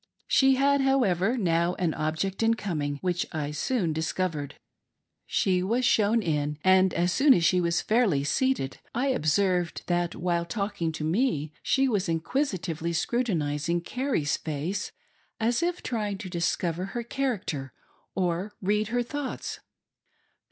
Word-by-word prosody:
She 270 0 +5
had, 280 +1 +3
however, 240 -5 +2
now 170 -3 +1
an 170 -4 0
object 160 +6 -2
in 225 0 +3
coming 155 -9 -2
which 180 -1 -1
I 150 -3 -3
soon 170 - 0
discovered. 160 -2 -2 0.7
She 185 -1 +1
was 235 +7 +1
shown 220 0 +3
in, 150 -3 -1
and 185 0 +5
as 175 +1 +2
soon 275 - +5
as 170 - +2
she 180 +1 +4
was 170 0 +1
fairly 215 - +2
seated, 150 - 0 0.2
I 265 +3 +1
observed 180 - +1
that, 175 -1 0
while 170 0 0
talking 200 -1 -2
to 155 - -5
me, 160 - 0
she 270 0 +2
was 200 -7 0
inquisitively 170 - -1
scru 240 +9 +1
tinizing 170 - -1
Carrie's 250 - -1
face, 160 +6 -3 0.5
as 235 +5 +1
if 350 +1 -1
trying 210 -5 -2
to 190 -1 -7
discover 175 0 -1
her 235 +4 -4
character 220 - -3 0.4
or 185 +2 -1
read 210 +2 +1
her 245 +2 0
thoughts. 290 +2 -5
185 Hz, 145 wpm, -27 LUFS, 165-235 Hz, 0.7 s, She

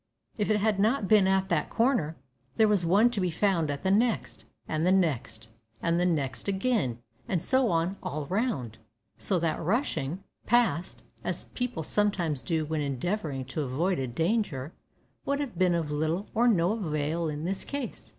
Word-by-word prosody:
If 210 -1 -1
it 215 - +4
had 210 -1 +1
not 215 0 +2
been 210 -2 +5
at 190 0 +2
that 165 -3 0
corner, 225 - +1 0.4
there 220 - +5
was 205 -4 +2
one 210 +7 +5
to 215 -5 -2
be 180 - +1
found 170 -2 +1
at 140 -1 -3
the 190 - +2
next 225 +3 0 0.2
and 155 0 -1
the 180 - +4
next 145 -11 0 0.3
and 170 0 +1
the 180 - +3
next 145 -4 -1
again, 195 - 0 0.3
and 175 -4 -1
so 260 -3 +3
on 170 +3 0
all 150 0 -4
round; 160 - -2 0.4
so 190 - +1
that, 165 -2 -1
rushing 180 - -1 0.2
past, 210 -8 +1 0.2
as - - -3
people 245 -10 -3
sometimes 175 -7 +1
do 155 +6 -1
when 155 0 -2
endeavouring 140 - -2
to 135 +4 -4
avoid 155 +7 0
a 130 - -1
danger, 160 - -1 0.5
would 280 0 -1
have 280 -8 -4
been 180 -2 +4
of 160 -3 -2
little 160 +6 -1
or 235 +2 +3
no 180 -5 +3
avail 160 -5 -1
in 150 +1 -4
this 190 +2 -2
case. 280 -3 -5
180 Hz, 180 wpm, -28 LUFS, 155-210 Hz, 0.5 s, been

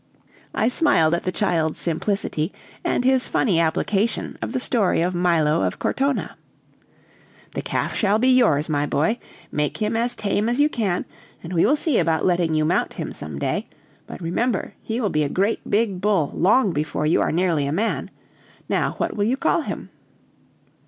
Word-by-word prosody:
I 220 - +2
smiled 235 - +3
at 170 - -1
the 185 - 0
child's 165 -6 0
simplicity, 170 -1 -1 0.3
and - - 0
his 260 -1 +3
funny 190 -9 +1
application 195 +7 0
of - - -3
the 260 - -1
story 230 -6 +1
of 180 +1 0
Milo 170 - +2
of 95 -1 -1
Cortona. 275 0 -1 1.1
"The - - -4
calf - - -2
shall 205 -1 +2
be 245 +4 +2
yours, 220 - +4
my 145 -2 0
boy. 215 +14 +1 0.3
Make 150 -1 -1
him 215 +1 -1
as 235 +2 0
tame 210 +1 0
as 245 +3 0
you 295 +1 +4
can, 205 -10 -1 0.4
and 170 +2 -6
we 170 +3 +3
will 285 - +4
see 300 -4 +1
about 160 -1 +1
letting 175 -3 +2
you 155 0 +2
mount 175 +4 0
him - - -5
some - - -7
day; - - -2 0.4
but - - -8
remember, 195 +6 -1
he 225 +2 -3
will 210 -5 0
be 155 - +1
a 145 - 0
great 200 +8 +1
bull 200 -6 +1
long 200 +1 +3
before 150 0 -2
you 155 - +3
are - - +1
nearly 165 -4 +1
a - - -1
man. 210 +9 -1 0.6
Now, - - 0
what - - -2
will 205 - 0
you 250 +5 +1
call - - +1
him?" - - -6
190 Hz, 180 wpm, -22 LUFS, 160-230 Hz, 1.1 s, yours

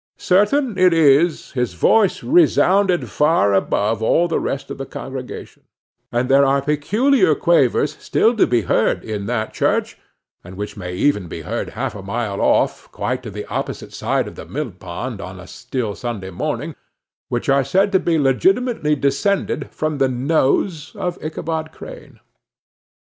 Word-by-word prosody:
Certain 210 +4 +2
it 185 -1 +5
is, 155 +1 +3
his 125 -8 -2
voice 200 - +3
resounded 200 - +3
far 150 -10 +2
above 105 +3 0
all 170 +10 +3
the 165 - 0
rest 135 - -4
of - - -7
the 135 - -4
congregation; 130 -1 -8 0.5
and 120 +1 0
there 135 +1 +5
are 140 0 +3
peculiar 170 - +2
quavers 145 -4 +2
still 230 +2 +2
to 220 - +3
be 120 -1 +2
heard 95 - +1
in 105 -2 -4
that 110 -2 -2
church, - - 0 0.4
and 90 +1 -11
which 105 +1 -5
may 90 -3 -6
even 105 -3 +1
be - - -7
heard - - -4
half - - -2
a 100 - -8
mile 100 0 -3
off, - - +1
quite 125 0 -3
to 120 - -8
the 105 0 -7
opposite - - -5
side - - -1
of - - -8
the - - -10
millpond, 105 +4 -5
on 95 -1 -8
a 90 - -10
still 120 +1 -4
Sunday 100 -5 -5
morning, 85 - -3 0.6
which 120 - -2
are 140 0 +3
said 190 +9 +2
to 190 - +4
be 170 -2 +1
legitimately 150 - +2
descended 145 +9 0
from 155 -2 -3
the 135 -1 +3
nose 145 +5 0
of 180 -1 -4
Ichabod 160 0 -4
Crane. - - -12
140 Hz, 160 wpm, -20 LUFS, 115-175 Hz, 0.6 s, it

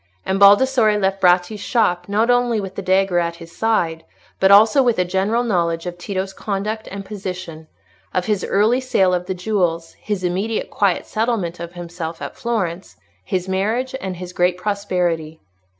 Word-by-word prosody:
And 190 +1 0
Baldassarre 215 +2 +5
left 195 0 0
Bratti's 180 +3 +3
shop, 190 -6 0
not 220 +4 +2
only 245 -2 +2
with 195 -2 -5
the 200 - -5
dagger 190 -1 +2
at 170 0 -2
his 170 0 -13
side, 170 -8 0 0.4
but 190 - +4
also 215 +7 +7
with 240 -3 +2
a 180 - +2
general 195 +6 0
knowledge 170 -6 0
of 175 -1 -4
Tito's 190 +1 -4
conduct 210 +2 -3
and 195 0 -7
position—of 165 - -7
his 210 -3 0
early 220 +6 +2
sale 190 -8 +2
of 180 0 -1
the 190 - -2
jewels, 175 -4 -1
his 205 -3 -3
immediate 195 +5 -2
quiet 195 -4 +1
settlement 215 -7 -2
of 170 0 -7
himself 170 -2 -6
at - - -7
Florence, 190 -7 -3 0.3
his 185 - -2
marriage, 215 +7 -1
and 190 -1 -4
his 180 0 -8
great 180 0 +1
prosperity. 180 -5 -2
190 Hz, 165 wpm, -20 LUFS, 175-215 Hz, 0.4 s, also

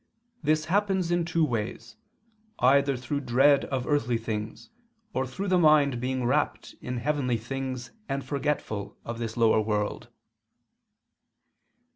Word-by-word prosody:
This 155 0 +1
happens 190 -1 +1
in 175 -1 +1
two 165 -1 +2
ways, 115 -2 -4 0.6
either 140 +1 +4
through 135 +3 -3
dread 135 +2 +4
of 130 -2 -2
earthly 125 -6 +1
things 110 - -5 0.4
or 130 0 -1
through 195 +10 -4
the 185 -1 +4
mind 150 -6 +4
being 130 0 -1
rapt 120 - 0
in 125 0 -4
heavenly 130 -1 0
things 130 +1 -5 0.2
and 135 0 -2
forgetful 140 -8 -2
of 115 0 -5
this 115 -1 -4
lower 115 -2 +4
world." 105 -1 -2
130 Hz, 130 wpm, -27 LUFS, 120-150 Hz, 0.6 s, either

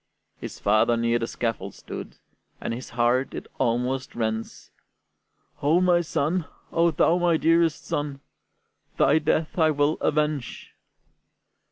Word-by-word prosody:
His - - -8
father 110 +3 +3
near 115 0 +1
the 115 - -2
scaffold 110 -6 -3
stood, - - -8 0.4
And - - -3
his 125 +2 -7
heart, 120 +3 +2
it - - -6
almost 125 +3 -1
rends: 110 -1 -4 0.9
"O 175 +4 +4
son, 160 +1 -1 0.3
O 170 0 +3
thou 165 +2 +2
my 175 -2 +3
dearest 165 -1 +2
son, 145 -1 -3 0.8
Thy 160 - +4
death 160 +2 0
I 160 -1 +5
will 145 0 +1
avenge!" 150 -4 -1
145 Hz, 125 wpm, -25 LUFS, 120-160 Hz, 0.9 s, I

